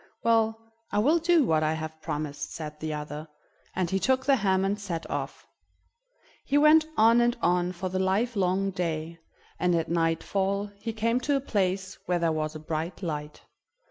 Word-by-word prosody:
"Well, 225 -1 +2 0.3
I - - -1
will 295 +11 +4
do 335 -1 +4
what 160 -9 +2
I 155 0 +1
have 160 0 -6
promised," 150 -2 -4
said 150 -2 -7
the 155 0 -3
other, 150 +1 -5 0.5
and 180 -2 -1
he 190 - +1
took 260 +4 +1
the 275 -1 +4
ham 190 -3 +2
and 200 +2 -1
set 170 -5 -4
off. - - -4 1.0
He 285 - +1
went 310 +1 +6
on 230 +2 +6
and 240 +1 +2
on 180 0 +1
for 185 +1 -4
the 185 +1 -2
livelong 195 -1 +1
day, 165 -2 -3 0.4
and 175 0 +2
at 165 -1 -1
nightfall 190 +5 0
he 225 +2 -3
came 230 +2 0
to 285 +3 0
a - - +2
place 195 -6 -1
where 180 - +2
there 170 -1 +1
was 155 0 -2
a - - -5
bright 160 +4 -4
light. 150 -3 -5
185 Hz, 180 wpm, -27 LUFS, 160-225 Hz, 1.0 s, went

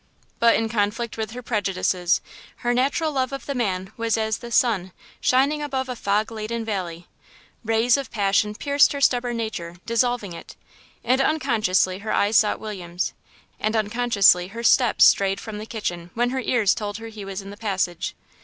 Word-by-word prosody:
But 235 0 +5
in 225 - 0
conflict 220 +1 -1
with 220 -2 -3
her 245 +2 -8
prejudices, 185 -5 0 0.4
her 240 - +3
natural 280 +5 +1
love 260 -2 -1
of 275 - -6
the 280 - -3
man 195 -5 -2
was 230 -1 0
as 220 0 -1
the 235 -1 -9
sun 200 -7 +1 0.3
shining 280 +4 +2
above 265 -3 -3
a 250 - -3
fog 210 0 0
laden 225 +1 -4
valley; 180 -5 -4 0.6
rays 225 +2 +3
of 275 - -5
passion 210 0 +1
pierced 285 +5 +3
her 280 - -3
stubborn 245 -2 +2
nature, 175 -7 -4
dissolving 230 -4 0
it, 170 - -11 0.5
and 255 +3 +2
unconsciously 220 -11 +1
her 215 +2 -4
eyes 205 +2 +2
sought 210 - +3
William's, 180 -5 -4 0.5
and 215 +1 -1
unconsciously 210 -4 +3
her 230 +4 -7
steps 240 0 +5
strayed 195 0 +3
from 215 -2 -7
the 215 - -7
kitchen 175 -7 -4
when 240 +1 +1
her 260 0 -1
ears 225 -6 +2
told 205 -1 -4
her 225 0 -8
he 215 -2 -9
was 195 0 -6
in 195 - -9
the - - -9
passage. 190 -5 -2
220 Hz, 180 wpm, -23 LUFS, 200-245 Hz, 0.6 s, But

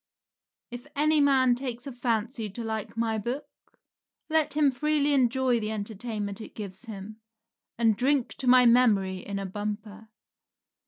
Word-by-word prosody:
If 245 +3 -8
any 305 +1 +3
man 265 -3 +4
takes 245 -1 -5
a 275 - -5
fancy 235 -2 -2
to 230 +5 -6
like 220 0 -4
my 225 -1 0
book, 245 +7 -4 0.9
let 315 -2 +2
him 295 -2 +4
freely 295 +2 +1
enjoy 255 -2 +2
the 215 -1 -3
entertainment 210 -1 -4
it - - -11
gives 200 +1 -7
him, 215 0 -9 0.6
and 225 -2 +3
drink 265 +2 +1
to 260 - -2
my 250 0 +7
memory 215 -6 +4
in 200 +1 -5
a 195 - -3
bumper. 210 +2 -6
235 Hz, 150 wpm, -27 LUFS, 210-260 Hz, 0.9 s, my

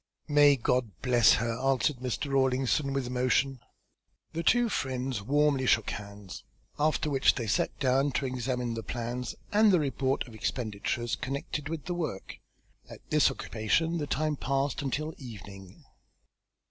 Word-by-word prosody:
"May 145 -1 +6
God 125 -1 0
bless 120 -3 +5
her!" 115 +1 -1
answered 135 +1 +1
Mr. 125 +2 -3
Rawlinson 135 +1 +1
with 135 -1 -1
emotion. 125 +2 +1 0.7
The 165 - -2
two 240 +8 +3
friends 130 - -2
warmly 140 +2 +2
shook 110 -3 +3
hands, 100 -2 -8 0.4
after 155 +1 +1
which 135 -3 +3
they 120 - -3
sat 105 - 0
down 135 +1 +2
to 135 - -1
examine 125 -1 -2
the 115 - -4
plans 120 +2 -4 0.2
and 215 0 +6
the 180 - +4
report 135 -2 -1
of 120 - -12
expenditures 110 +1 -2
connected 140 +2 -4
with 160 -3 -5
the 180 - -2
work. 160 - -5 0.5
At - - -13
this - - +5
occupation 160 - -1
the 145 - -3
time 150 +1 -1
passed 135 +2 -1
until 150 +3 -2
evening. 100 -7 -11
130 Hz, 145 wpm, -29 LUFS, 120-145 Hz, 0.7 s, May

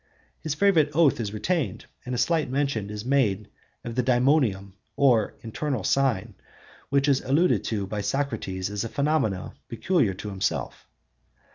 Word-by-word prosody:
His 155 -2 -3
favorite 165 -5 +4
oath 155 -6 +4
is 105 -3 -3
retained, 115 - -2 0.2
and 125 - -2
a - - -2
slight 155 +3 +1
mention 130 -6 -1
is 105 +1 -6
made 110 -7 +1 0.3
of 120 - -5
the 125 - +1
daemonium, 120 -6 +2 0.2
or 125 -7 +3
internal 120 0 -3
sign, 115 -4 +1 0.6
which 140 0 +2
is 135 -2 +3
alluded 155 +7 +2
to 105 -3 -2
by 105 +2 -4
Socrates 105 -5 -2
as 105 -1 -2
a 115 - -4
phenomenon 140 -10 -1
peculiar 115 - +1
to 105 - -6
himself. 95 -1 -3
120 Hz, 150 wpm, -25 LUFS, 105-140 Hz, 0.6 s, favorite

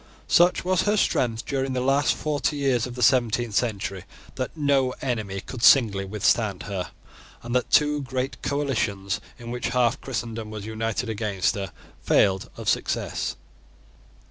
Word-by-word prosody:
Such 175 0 +4
was 185 0 +2
her 210 +2 +1
strength 115 - +1
during 135 -1 -1
the 130 - 0
last 135 +2 +2
forty 150 -1 -1
years 130 -4 +1
of 120 - -8
the 125 - -1
seventeenth 120 -3 +2
century, 100 -4 -1 0.3
that 130 +4 -5
no 140 -3 +2
enemy 110 -7 -3
could 125 - -8
singly 110 -7 +5
withstand 105 0 +1
her, 95 -3 -4 0.5
and 120 +1 -4
that 125 - +1
two 150 -1 +3
great 130 0 -3
coalitions, 110 -9 -1 0.2
in 120 -1 -8
which 125 0 -2
half 125 +1 +2
Christendom 115 -3 -4
was 105 -1 -7
united 110 0 -2
against 105 -4 0
her, 100 -3 -5 0.3
failed 95 -1 +2
of - - -7
success. - - -1
120 Hz, 150 wpm, -25 LUFS, 105-135 Hz, 0.5 s, singly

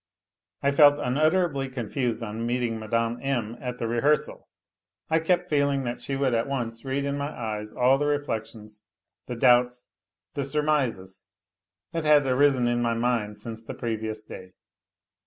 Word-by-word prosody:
I 140 - +3
felt 145 0 +6
unutterably 150 +1 +1
confused 120 -1 -2
on 110 +1 -4
meeting 120 -1 -1
Mme. 115 +2 -1
M. 120 -5 -2
at 125 -1 -5
the 115 - -2
re 120 +1 -1
hearsal. 150 +3 +1 0.6
I 160 - +4
kept 180 +2 +1
feeling 140 -3 +1
that 120 -1 -4
she 135 - -3
would 135 -2 +1
at 115 +2 +1
once 120 -4 -4
read 135 +1 -2
in 140 0 -2
my 140 - -2
eyes 105 -5 -5
all 130 +2 +3
the 145 - 0
reflections, 110 -7 -4 0.5
the 125 - -4
doubts, 125 0 +3 0.4
the 140 - -2
surmises, 135 -10 -1 0.7
that 165 - -2
had 150 -2 +5
arisen 130 -1 +3
in 120 0 +1
my 115 -1 +1
mind 115 -3 -1
since 110 +1 -8
the 115 - -8
previous 110 -2 -3
day. 95 -3 -11
125 Hz, 160 wpm, -26 LUFS, 115-140 Hz, 0.7 s, felt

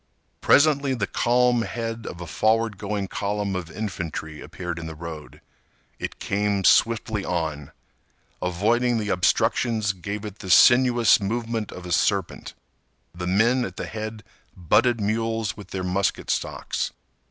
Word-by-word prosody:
Presently 140 -2 +4
the 105 -4 -1
calm 120 +2 +2
head 115 0 -4
of 90 - -7
a - - -5
forward 110 +4 +1
going 100 -1 -3
column 100 0 -2
of 90 -3 -4
infantry 80 -6 -5
appeared 85 -2 -6
in 80 - -6
the 80 - -7
road. 80 -1 -9 0.6
It - - -5
came 100 -1 -1
swiftly 110 -1 +3
on. 80 -6 -3 0.7
Avoiding 115 +7 +1
the 105 -2 -2
obstructions 110 +3 +1
gave 100 +3 -6
it 105 -1 -8
the 95 - -8
sinuous 120 +1 +6
movement 115 +1 -2
of 90 - -9
a 90 - -6
serpent. 95 +1 0 0.6
The 90 0 -5
men 115 +7 +3
at 95 -5 -6
the - - -4
head 110 0 -6 0.3
butted 115 +7 +2
mules 110 +1 -1
with 100 -3 -11
their 95 0 -4
musket 95 +1 -1
stocks. - - -2
105 Hz, 140 wpm, -24 LUFS, 90-115 Hz, 0.7 s, sinuous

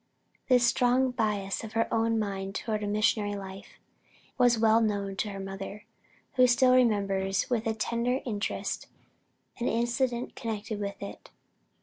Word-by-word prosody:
This 250 -2 +5
strong 250 +2 +3
bias 210 -5 -1
of 220 0 -8
her 230 0 +1
mind 210 -4 0
toward 215 -2 -2
a 205 - -2
missionary 210 0 +1
life, 195 -1 -9 0.6
was 245 -2 +4
well 220 0 +4
known 200 -3 -1
to 210 - -1
her 195 -1 -6
mother, 195 +2 -7 0.5
who 255 0 +7
still 255 +1 +5
remembers 200 -5 +2
with 230 -2 0
a 220 - 0
tender 235 +3 0
interest 215 -4 -3 0.7
an 240 - -1
incident 240 +1 0
connected 220 -2 -4
with 200 0 -5
it. 200 - -9
220 Hz, 140 wpm, -29 LUFS, 200-240 Hz, 0.7 s, who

